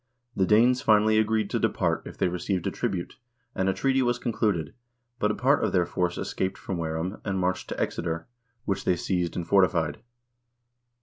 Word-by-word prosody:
The 95 Hz, -, +2 dB
Danes 120 Hz, +4 st, +4 dB
finally 110 Hz, 0 st, +4 dB
agreed 110 Hz, -1 st, +1 dB
to -, -, 0 dB
depart -, -, 0 dB
if -, -, -10 dB
they -, -, +2 dB
received 90 Hz, +1 st, -2 dB
a -, -, 0 dB
tribute, 90 Hz, -2 st, -3 dB, 0.4 s
and 95 Hz, 0 st, 0 dB
a -, -, +2 dB
treaty 135 Hz, -1 st, +2 dB
was 120 Hz, -1 st, +1 dB
concluded, 105 Hz, -, -1 dB, 0.5 s
but 105 Hz, -, +2 dB
a 105 Hz, -, 0 dB
part 140 Hz, +4 st, +2 dB
of -, -, 0 dB
their 90 Hz, -2 st, +3 dB
force 90 Hz, 0 st, -1 dB
escaped 95 Hz, 0 st, -2 dB
from 95 Hz, -3 st, -4 dB
Ware 80 Hz, -1 st, -2 dB
ham 90 Hz, +5 st, -4 dB
and 95 Hz, -2 st, -2 dB
marched 95 Hz, 0 st, -1 dB
to -, -, -4 dB
Exeter, 85 Hz, -1 st, -2 dB, 0.4 s
which 95 Hz, -1 st, -1 dB
they 90 Hz, -, +2 dB
seized 90 Hz, -1 st, -1 dB
and 85 Hz, -2 st, -3 dB
fortified. 85 Hz, -6 st, +2 dB
95 Hz, 190 wpm, -26 LUFS, 90-110 Hz, 0.5 s, Danes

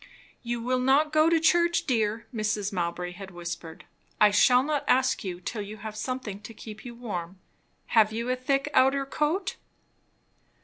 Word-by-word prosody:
"You 240 Hz, 0 st, -3 dB
will 255 Hz, +1 st, +1 dB
not 280 Hz, +4 st, +3 dB
go 310 Hz, +1 st, +5 dB
to 335 Hz, -1 st, +3 dB
church, 340 Hz, +1 st, +3 dB
dear," 225 Hz, -3 st, 0 dB
Mrs. 210 Hz, -2 st, -1 dB
Mowbray 175 Hz, 0 st, -2 dB
had 190 Hz, +2 st, -9 dB
whispered. 170 Hz, -2 st, -7 dB, 0.3 s
"I 210 Hz, -1 st, +6 dB
shall 250 Hz, +5 st, +5 dB
not 295 Hz, 0 st, -1 dB
ask 260 Hz, 0 st, +2 dB
you 180 Hz, -3 st, -5 dB
till 210 Hz, +4 st, -4 dB
you 205 Hz, +1 st, -7 dB
have 215 Hz, 0 st, -7 dB
something 220 Hz, -3 st, -4 dB
to 220 Hz, +2 st, -11 dB
keep 215 Hz, 0 st, -10 dB
you 240 Hz, -1 st, -8 dB
warm. 190 Hz, -7 st, -5 dB, 0.6 s
Have 220 Hz, -2 st, +5 dB
you 230 Hz, +2 st, -3 dB
a -, -, +1 dB
thick 275 Hz, +2 st, 0 dB
outer 275 Hz, +1 st, +4 dB
coat?" 330 Hz, +8 st, -1 dB
230 Hz, 170 wpm, -27 LUFS, 205-270 Hz, 0.6 s, I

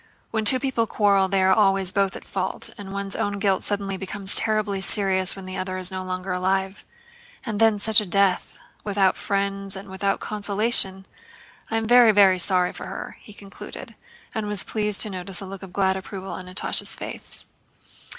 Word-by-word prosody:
When 220 Hz, -1 st, -1 dB
two 255 Hz, +5 st, +5 dB
people 255 Hz, -4 st, -1 dB
quarrel 200 Hz, -3 st, +2 dB
they 190 Hz, 0 st, +1 dB
are 190 Hz, 0 st, +5 dB
always 195 Hz, -2 st, +2 dB
both 195 Hz, -2 st, 0 dB
in -, -, -9 dB
fault, 190 Hz, -1 st, -4 dB
and 200 Hz, -1 st, -9 dB
one's 200 Hz, 0 st, -3 dB
own 205 Hz, 0 st, -2 dB
guilt 195 Hz, -2 st, 0 dB
suddenly 200 Hz, -1 st, -2 dB
becomes 195 Hz, +1 st, 0 dB
terribly 215 Hz, -3 st, +2 dB
serious 190 Hz, -2 st, 0 dB
when 195 Hz, -1 st, -10 dB
the 185 Hz, 0 st, -6 dB
other 185 Hz, 0 st, -4 dB
is 185 Hz, 0 st, +2 dB
no 185 Hz, 0 st, -5 dB
longer 185 Hz, 0 st, -5 dB
alive. 190 Hz, +2 st, -1 dB, 0.6 s
And 215 Hz, -4 st, -3 dB
then 225 Hz, -2 st, +4 dB
such 215 Hz, +1 st, +5 dB
a -, -, -4 dB
death... 195 Hz, 0 st, +1 dB, 0.3 s
without 195 Hz, -2 st, +1 dB
friends 195 Hz, 0 st, -2 dB
and 195 Hz, +1 st, -9 dB
without 195 Hz, +1 st, -1 dB
consolation! 205 Hz, -2 st, +1 dB, 0.6 s
I 225 Hz, -, -1 dB
am 225 Hz, -, -1 dB
very, 240 Hz, 0 st, +6 dB
very 195 Hz, -3 st, +5 dB
sorry 180 Hz, 0 st, +1 dB
for -, -, -8 dB
her," 190 Hz, -, -7 dB
he -, -, -14 dB
concluded, 200 Hz, -1 st, -11 dB, 0.4 s
and 220 Hz, -3 st, -3 dB
was 205 Hz, -2 st, 0 dB
pleased 210 Hz, -2 st, +1 dB
to 215 Hz, -, +2 dB
notice 185 Hz, 0 st, -1 dB
a 195 Hz, -, -4 dB
look 195 Hz, 0 st, -9 dB
of 190 Hz, -2 st, -10 dB
glad 190 Hz, 0 st, +1 dB
approval 190 Hz, 0 st, -7 dB
on 185 Hz, -, -7 dB
Natásha's 185 Hz, +1 st, 0 dB
face. -, -, -5 dB
195 Hz, 190 wpm, -23 LUFS, 190-205 Hz, 0.6 s, very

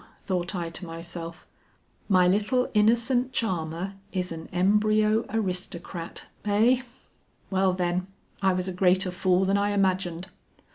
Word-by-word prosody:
thought 185 Hz, 0 st, -2 dB
I 170 Hz, -2 st, -3 dB
to 165 Hz, -, -8 dB
myself; 165 Hz, 0 st, -7 dB, 0.6 s
"my 185 Hz, -2 st, +5 dB
little 210 Hz, +7 st, +1 dB
innocent 240 Hz, +4 st, +3 dB
charmer 180 Hz, -3 st, -2 dB, 0.2 s
is 180 Hz, -2 st, -2 dB
an 165 Hz, -1 st, -7 dB
embryo 215 Hz, +4 st, +3 dB
aristocrat, 180 Hz, -4 st, -4 dB, 0.2 s
eh? 225 Hz, +5 st, +3 dB, 0.7 s
Well 190 Hz, -1 st, +3 dB
then, 180 Hz, 0 st, -1 dB, 0.3 s
I 190 Hz, -1 st, +3 dB
was 185 Hz, 0 st, -2 dB
a 185 Hz, -, -3 dB
greater 185 Hz, 0 st, +3 dB
fool 185 Hz, +1 st, +2 dB
than 195 Hz, +1 st, +2 dB
I 205 Hz, 0 st, +1 dB
imagined." 185 Hz, -3 st, 0 dB
185 Hz, 130 wpm, -26 LUFS, 180-210 Hz, 0.7 s, my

